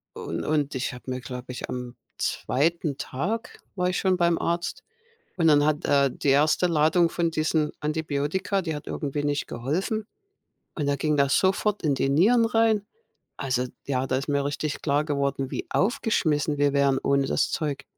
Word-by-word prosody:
u - - -7
und - - -4
und 150 -2 0
ich 125 - -2
habe 125 +1 -8
mir, 130 - -3
glaube 125 0 -7
ich 125 - -6
am 125 -1 -6 0.2
2. 155 +1 0
Tag 200 - -4 0.2
war 180 -1 +1
ich 185 - -1
schon 190 -1 +2
beim 170 -1 +3
Arzt. 170 0 -2 0.5
Und 165 - +3
dann 145 -1 +5
hat 155 -1 0
er 140 -1 +4
die 140 - -2
1. 155 +5 +4
Ladung 165 +1 +3
von 170 -1 0
diesen 155 -1 0
Antibiotika, 155 +5 -1
die 160 -4 -3
hat 150 - -8
irgendwie 145 0 -3
nicht 145 0 -1
geholfen. 190 - -2 0.7
Und 145 -3 -2
da 140 - +2
ging 150 0 0
das 140 0 +3
sofort 195 +2 +1
in 150 -3 +2
die 135 - 0
Nieren 225 - +4
rein. 225 -2 +2 0.5
Also, 130 -2 -1 0.2
ja, 130 -1 0
da 130 - 0
ist 135 - -3
mir 140 -1 +1
richtig 145 +1 -3
klar 145 0 +1
geworden, 140 -2 -1
wie - - -4
aufgeschmissen 155 -9 +1
wir 145 0 +3
wären 140 -1 +3
ohne 140 -1 +2
das - - +1
Zeug. 145 -2 -2
150 Hz, 185 wpm, -26 LUFS, 140-170 Hz, 0.7 s, dann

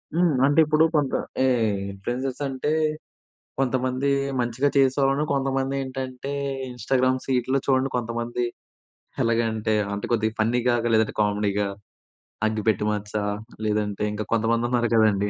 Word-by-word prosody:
హ్మ్. 170 -4 +3
అంటే 145 +3 +3
ఇప్పుడు 155 +1 +3
కొంత 145 -3 +1 0.3
ఎహ్ 115 -6 +2
ఇన్‌ఫ్లుయెన్సర్స్ 125 +8 -4
అంటే 135 +3 -2 0.9
కొంతమంది 130 +1 0 0.3
మంచిగా 125 +4 +1
చేసేవాళ్ళున్నారు. 135 +2 +3
కొంతమంది 135 0 0
ఏంటంటే 130 +1 -5 0.4
ఇన్‌స్టాగ్రామ్ 130 +2 +1
సీట్లో 130 +1 +1
చూడండి, 135 0 +2
కొంతమంది 120 +1 -2 0.8
ఎలాగంటే 115 -2 +1 0.2
అంటే 100 - -3
కొద్దిగా 110 -1 +1
ఫన్నీగా, 120 +2 +2
గ - - -3
లేదంటే 110 -1 +3
కామెడీగా, 105 -1 +1 0.8
అగ్గిపెట్టి 110 -1 0
మచ్చా 105 0 -3 0.4
లేదంటే 105 -1 -1
ఇంకా 105 +1 -3
కొంతమంది 115 +1 +2
ఉన్నారు 120 -1 +1
గదండీ. 105 -2 +3
120 Hz, 120 wpm, -24 LUFS, 110-135 Hz, 0.9 s, హ్మ్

